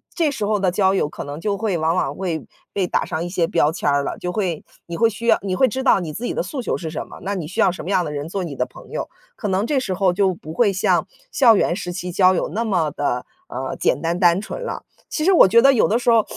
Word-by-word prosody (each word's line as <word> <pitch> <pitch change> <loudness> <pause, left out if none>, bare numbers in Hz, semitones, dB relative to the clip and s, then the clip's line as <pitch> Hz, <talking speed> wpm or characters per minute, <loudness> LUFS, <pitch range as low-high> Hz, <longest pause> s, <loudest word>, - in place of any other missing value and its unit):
这 325 -4 +1
时 265 -7 -3
候 210 +1 +1
的 190 -3 +1
交 190 0 +2
友 170 -6 0
可 - - -7
能 145 +3 -7
就 200 0 -1
会 200 -4 -1
往 160 +2 +1
往 - - -1
会 175 -5 -3 0.3
被 190 -3 -1
打 - - 0
上 160 +2 -3
一 - - -3
些 175 -1 0
标 160 -2 +1
签 145 - -1
儿 140 0 +2
了， - - -4
就 180 - -4
会 180 -5 -2 0.2
你 170 - -6
会 230 +4 +3
需 225 +2 -7
要 - - +5
你 195 -2 -3
会 260 +8 +3
知 260 +1 -3
道 255 - +4
你 160 -4 -5
自 225 - -6
己 - - -2
的 - - -1
诉 270 -4 -5
求 - - -2
是 165 - -5
什 155 - -5
么， - - -12
那 200 +1 -2
你 175 - -4
需 170 - -7
要 - - +5
什 - - -8
么 175 - -6
样 185 -3 +2
的 150 - -5
人 145 +2 -4
做 185 +1 -3
你 150 -4 -6
的 125 - 0
朋 125 - -15
友。 - - -4 0.3
可 210 - -4
能 190 +4 0
这 275 -1 +1
时 195 -7 -2
候 185 -1 +2
就 190 0 +2
不 160 -2 -10
会 205 +1 +3
像 190 - +1 0.2
校 235 - +5
园 170 - +1
时 180 -2 -5
期， 180 0 -5
交 185 +1 +4
友 - - 0
那 225 +4 -1
么 180 -8 +1
地， 125 -3 -2 0.2
呃， 130 +1 -4
简 - - +1
单、 170 +1 -1
单 175 -1 +4
纯 215 - -6
了。 - - -5 0.2
其 310 - -3
实 385 - +4
我 345 - +7
觉 230 +5 +5
得 275 - +7
有 245 - +3
的 225 - +2
时 240 -1 +2
候 225 -2 +4
185 Hz, 325 characters per minute, -21 LUFS, 165-215 Hz, 0.3 s, 我